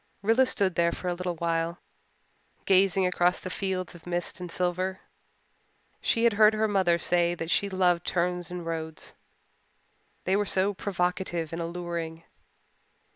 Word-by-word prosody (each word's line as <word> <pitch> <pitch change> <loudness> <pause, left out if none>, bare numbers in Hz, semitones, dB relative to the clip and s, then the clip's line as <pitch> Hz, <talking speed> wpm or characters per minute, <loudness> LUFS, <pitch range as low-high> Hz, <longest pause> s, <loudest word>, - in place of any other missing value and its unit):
Rilla 230 +5 +4
stood 195 -7 +2
there 170 0 +2
for 180 - -4
a - - 0
little 180 0 -3
while, 165 +1 -1 0.9
gazing 190 -1 +4
across 180 0 +2
the 185 - -6
fields 185 -2 -2
of 175 0 -14
mist 175 0 -2
and 180 -1 -6
silver. 185 +2 -1 1.0
She 230 - +1
had 235 -2 +5
heard 215 +1 +5
her 220 0 +2
mother 190 -4 +3
say 175 0 +2
that 165 0 -4
she 200 - +2
loved 180 -2 +2
turns 180 -1 -1
in 180 -1 -5
roads 160 -1 -4 1.1
they 190 - +1
were 205 0 +1
so 195 +2 +1
provocative 180 -4 -2
and 165 - -3
alluring. 170 -1 -4
180 Hz, 150 wpm, -28 LUFS, 170-190 Hz, 1.1 s, had